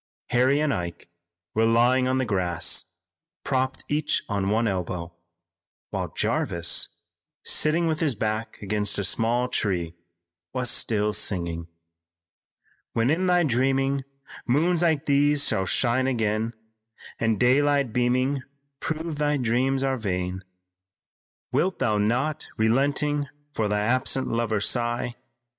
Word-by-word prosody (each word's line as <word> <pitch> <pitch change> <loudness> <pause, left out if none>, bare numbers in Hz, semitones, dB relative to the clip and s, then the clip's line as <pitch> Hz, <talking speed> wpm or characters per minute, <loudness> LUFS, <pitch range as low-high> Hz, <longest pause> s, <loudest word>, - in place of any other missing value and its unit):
Harry 130 +4 +3
and 150 -2 +1
Ike 85 -4 -5 0.4
were 110 +1 +2
lying 120 +3 +3
on 130 0 +1
the 130 - +1
grass, 90 -5 0 0.6
propped 130 0 -1
each 150 +1 0
on 100 -2 -1
one 115 +2 +2
elbow, 90 -3 -3 0.8
while - - -2
Jarvis, 85 -1 0 0.6
sitting 160 +3 +3
with 160 -1 0
his 150 -7 +1
back 110 +1 -3
against 105 0 -1
a 100 - 0
small 120 +5 +1
tree, 90 -8 -1 0.6
was 125 -1 +1
still 105 -1 +1
singing: 85 -5 -2 1.3
"When 115 +4 +2
in 185 +4 +1
thy 180 -1 +4
dreaming, 135 +1 +1 0.4
moons 160 +7 +2
like 160 -4 +2
these 145 0 +4
shall 95 -1 0
shine 130 +4 +2
again 110 -2 -1 0.6
And 115 -3 +1
daylight 140 0 +3
beaming 130 +3 +1 0.4
prove 160 -1 -4
thy 150 0 +2
dreams 130 +2 +1
are 135 -1 0
vain, 90 -3 -3 1.1
Wilt 185 +1 +1
thou 105 -2 +1
not, 130 +9 0
relenting, 140 +5 +1 0.3
for 110 -5 0
thy 105 0 0
absent 130 +4 +1
lover 115 -3 0
sigh? 120 +2 -1
120 Hz, 125 wpm, -25 LUFS, 105-140 Hz, 1.3 s, thy